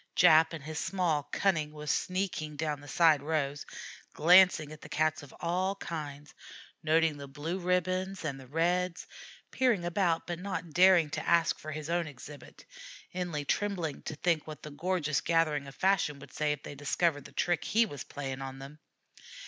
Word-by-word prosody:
Jap, 160 +1 +6
in 155 - -9
his 155 +1 -5
small 165 -7 0
cunning, 160 -6 +1
was 150 -1 -3
sneaking 185 -5 -2
down 150 -1 -2
the 145 - -12
side 155 0 +4
rows, 145 -2 -2 0.5
glancing 175 -2 +5
at 155 - -11
the - - -11
Cats 155 0 +1
of 145 - -13
all 185 +3 0
kinds, 150 -5 -7 0.5
noting 160 -1 +2
the 140 -1 -8
blue 150 +7 -4
ribbons 185 +1 -1
and 140 -3 -3
the 130 - -12
reds, 175 +4 0 0.5
peering 240 -9 +2
about 175 -1 +1
but 175 -1 -4
not 185 -3 -4
daring 180 -4 +5
to - - -3
ask 170 -1 +3
for 155 - -7
his 155 0 -5
own 170 0 0
exhibit, 145 -1 -12 0.5
inly 175 -5 -3
trembling 175 -5 -1
to 155 - -6
think 160 0 0
what 155 -1 -9
the 150 - -7
gorgeous 155 -1 -1
gathering 155 -4 +1
of 140 - -11
fashion 190 -6 +1
would 140 - -13
say 150 -1 0
if 145 -1 -4
they - - -7
discovered 145 +1 0
the - - -11
trick 175 -3 0
he 230 +2 +3
was 145 - -7
playing 135 -2 -6
on 135 0 -6
them. 140 +3 -10
155 Hz, 180 wpm, -30 LUFS, 145-180 Hz, 0.5 s, Jap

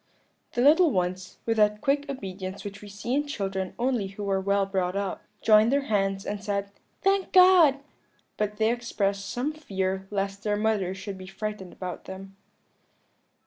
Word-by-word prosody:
"The 240 - +1
little 320 +5 +6
ones, 185 -3 -2
with 225 -1 0
that 210 0 +3
quick 280 +4 0
obedience 190 -6 -6
which 200 -1 -7
we 205 - -10
see 205 +5 -4
in 290 +2 +1
children 195 -7 -3
only 240 -4 0
who 200 +1 -6
are 190 0 +1
well 200 0 +2
brought 190 -1 -1
up, 200 -1 -2 0.2
joined 215 +1 +6
their 280 0 +2
hands 195 -4 0
and 205 0 -4
said, 200 -1 -2 0.3
'Thank 390 0 +2
God!' 360 -7 +7 0.5
but 210 0 -2
they 220 +1 +3
expressed 200 -5 -1
some 270 +6 -2
fear 190 -10 -3
lest 195 -1 -2
their 205 0 0
mother 205 -4 0
should 190 0 -7
be 185 - -9
frightened 195 -1 -5
about 180 -2 -6
them. 195 +1 -9
205 Hz, 170 wpm, -27 LUFS, 195-240 Hz, 0.5 s, God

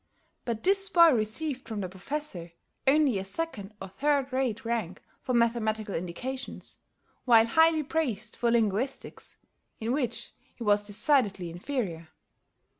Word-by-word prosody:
But 230 -2 -3
this 390 +1 +4
boy 340 -3 +7
received 250 +5 -1
from 220 -2 -4
the 185 - -3
Professor 190 - -5 0.3
only 275 -6 +4
a - - -4
second 210 -2 -4
or 195 - -6
third 275 +5 0
rate 255 -3 -1
rank 225 -6 -2 0.2
for 255 - -1
mathematical 220 -3 +1
indications, 250 +11 -5 0.5
while 230 -3 +6
highly 320 +5 +4
praised 250 -8 -2
for 240 - +1
linguistics, 230 +3 -1 0.4
in 225 +1 -2
which 245 -4 -1 0.2
he 240 - -7
was 205 -1 +4
decidedly 205 - +1
inferior. 175 - -4
235 Hz, 130 wpm, -28 LUFS, 205-275 Hz, 0.5 s, boy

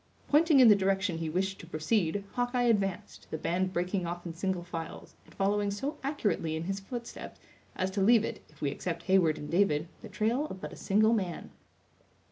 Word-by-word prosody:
Pointing 305 -1 +5
in 255 - +9
the 210 - +8
direction 195 -2 0
he 165 -1 -2
wished 190 +4 -1
to 170 - -11
proceed, 175 +3 0
Hawkeye 245 0 0
advanced, 200 -6 0
the 160 - -3
band 185 +4 -1
breaking 180 0 -1
off 175 +1 -5
in 170 - -5
single 185 +1 -2
files, 165 -2 -7
and - - -18
following 205 +1 +1
so 275 +10 -4
accurately 210 - -1
in 160 - -3
his 195 +3 -3
footsteps, 235 +4 -8 0.4
as 185 +1 -1
to 195 +1 -1
leave 225 +2 +5
it, - - -5
if 150 - -22
we 140 - 0
except 170 +1 -4
Heyward 180 -4 +3
and 150 - -7
David, 170 -4 +2
the 220 - -9
trail 225 +9 0
of 190 - -8
but - - -7
a - - -8
single 215 +3 +3
man. 185 -6 -2
195 Hz, 200 wpm, -30 LUFS, 175-220 Hz, 0.4 s, in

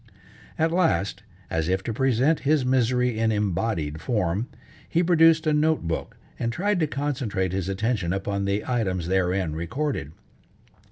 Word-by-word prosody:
At 160 +1 +2
last, 165 - +1 0.3
as 80 +1 0
if 95 +1 0
to 115 - -3
present 135 +5 +2
his 145 -2 +2
misery 125 -2 +1
in 110 0 +2
embodied 95 -6 -1
form, 105 -1 -1 0.4
he 170 - +2
produced 165 -1 +5
a 155 - +2
note 155 +1 +2
book 80 - -4 0.2
and 115 - -1
tried 195 - 0
to 155 - +2
concentrate 125 -11 -2
his 95 -1 -2
attention 95 -2 -1
upon 100 +1 -2
the 100 +1 -1
items 95 -9 -1
therein 90 -2 +1
recorded. 85 - -3
115 Hz, 150 wpm, -25 LUFS, 95-145 Hz, 0.4 s, produced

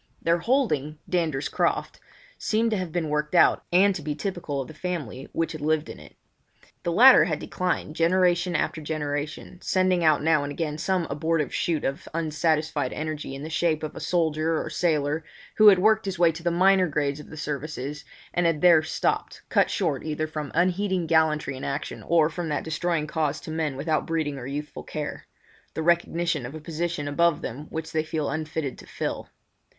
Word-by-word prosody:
Their 170 +1 +2
holding, 165 - 0
Dander's 160 -6 0
Croft, - - -1 0.4
seemed 225 +1 +1
to 215 - +1
have 180 -3 -4
been 160 -2 -1
worked 150 +2 -1
out, - - +5
and 195 +3 +5
to - - -5
be 150 -1 -3
typical 160 -4 -3
of 135 - -4
the 155 - -10
family 150 -8 -5
which 165 - -1
had 155 -2 -7
inhabited 155 +1 -1
it. - - -15 0.7
The 170 - -1
latter 245 +2 +8
had 160 -4 -1
declined 180 -2 -2
generation 175 +1 +2
after 160 - -1
generation, 150 +2 -4
sending 185 -2 +2
out 155 -2 +4
now 160 -1 +3
and 145 - -4
again 150 0 -3
some 185 +1 0
abortive 155 +1 0
shoot 165 -3 0
of 135 - -3
unsatisfied 155 -3 0
energy 155 -3 -4
in 135 - -7
the 155 - -5
shape 160 -1 +1
of 155 - -5
a - - -6
soldier 160 -2 0
or - - -5
sailor, 155 -2 0 0.3
who 215 - +7
had 200 -2 +9
worked 215 +3 +3
his 190 -2 -3
way 170 -1 +5
to 165 +1 -9
the 175 - +1
minor 185 +2 +4
grades 145 -1 -1
of 150 - -11
the 160 - -10
services 150 -1 -4 0.3
and 175 -1 +2
had 165 -2 +1
there 170 -3 +7
stopped, 155 - -2
cut - - +3
short - - -1
either 155 0 -2
from 155 -2 -5
unheeding 185 +1 +1
gallantry 160 -3 +2
in 130 - -8
action 140 +2 -4
or 165 -2 +4
from 165 +1 -4
that 150 - -1
destroying 165 0 -1
cause 155 -1 -1
to - - -7
men 155 -3 -1
without 155 +2 -1
breeding 155 -4 -1
or 125 - -7
youthful 145 +2 -5
care—the 155 +1 -8
recognition 170 -2 +1
of 135 - -9
a - - -6
position 165 -1 -3
above 170 +2 +2
them 145 +6 -6
which 160 0 -5
they 160 - +1
feel 155 -1 -2
unfitted 155 -3 -3
to - - -13
fill. - - -4
160 Hz, 190 wpm, -25 LUFS, 150-175 Hz, 0.7 s, had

